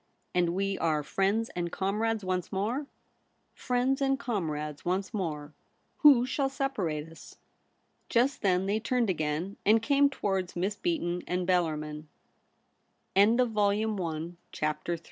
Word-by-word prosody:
* - - -45
And 175 -1 +2
we 195 0 -1
are 155 -3 +1
friends 200 +8 0
and 175 -1 -2
comrades 210 +3 -1
once 185 -1 -2
more 225 +9 -1 0.2
?' - - -44
* - - -45
Friends 255 +2 0
and 270 0 +2
comrades 155 - -3
once 190 +4 -1
more. 155 -7 -3 0.5
Who 275 -5 +7
shall 270 +1 0
separate 200 - -2
us 165 0 -14 0.3
?' - - -44
Just 250 +4 +2
then 185 -2 +2
they 205 +2 +1
turned 235 -2 +1
again, 155 +4 -2
and 220 +2 +5
came 280 +4 +3
towards 195 -8 -2
Miss 190 +4 -1
Beaton 200 - -1
and 180 0 -1
Bellarmin. 155 -4 0
195 Hz, 130 wpm, -29 LUFS, 170-240 Hz, 0.5 s, Who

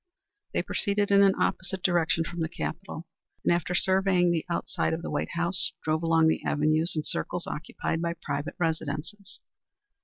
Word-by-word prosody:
They - - +1
proceeded 205 0 0
in 200 0 +7
an 195 -1 +5
opposite 185 0 -1
direction 170 -2 +2
from 170 +1 -6
the 160 -1 -1
Capitol, 170 -1 -5 0.4
and - - +5
after 175 +1 -1
surveying 185 -1 +3
the 165 -2 0
outside 170 -1 -1
of 165 +1 -3
the - - -4
White - - -2
House, 170 +2 0
drove 155 0 0
along 165 -1 +4
the 160 - +2
avenues 155 +3 +2
and 155 -1 -2
circles 175 +2 -2
occupied 160 +1 -3
by 170 0 -1
private 145 +1 -4
residences. 160 +4 -3
170 Hz, 165 wpm, -28 LUFS, 160-185 Hz, 0.4 s, in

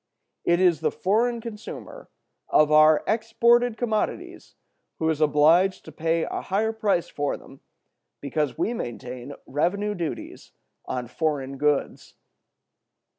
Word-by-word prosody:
It 170 0 +2
is 180 -4 +4
the - - +1
foreign 230 +5 0
consumer 230 - -9 0.4
of 155 0 +4
our 155 0 +6
exported 235 +1 +2
commodities 220 -3 -3 0.4
who 160 - -1
is 155 -1 -3
obliged 155 +6 +4
to 160 - -10
pay 165 +2 0
a - - -3
higher 215 +4 -1
price 205 -6 0
for 145 -1 -2
them 135 - -16 0.6
because 145 +1 -2
we 235 - 0
maintain 125 - -6
revenue 200 +8 -1
duties 170 -5 -6 0.3
on 125 -1 -3
foreign 135 -1 -2
goods. 150 -1 -1
165 Hz, 125 wpm, -25 LUFS, 150-215 Hz, 0.6 s, our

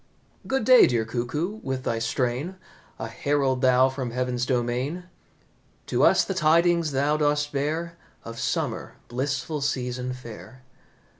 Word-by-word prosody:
"Good 265 -3 0
day, 255 +2 +7
dear 115 -2 0
Cuckoo, 150 - -3
with 130 -1 -3
thy 115 -3 -1
strain 125 +9 -1 0.4
A 115 - -5
herald 135 +2 0
thou 130 0 +5
from 130 -2 -4
heaven's 125 0 -2
domain; 125 +7 -1 0.8
To - - 0
us - - +5
the 195 - -2
tidings 170 -1 +3
thou 140 +3 +1
dost 150 0 +1
bear 160 +4 -2 0.2
Of 115 0 -8
summer, - - -2
blissful 140 +4 -2
season 125 -2 -2
fair. 130 +1 -11
135 Hz, 135 wpm, -25 LUFS, 125-155 Hz, 0.8 s, day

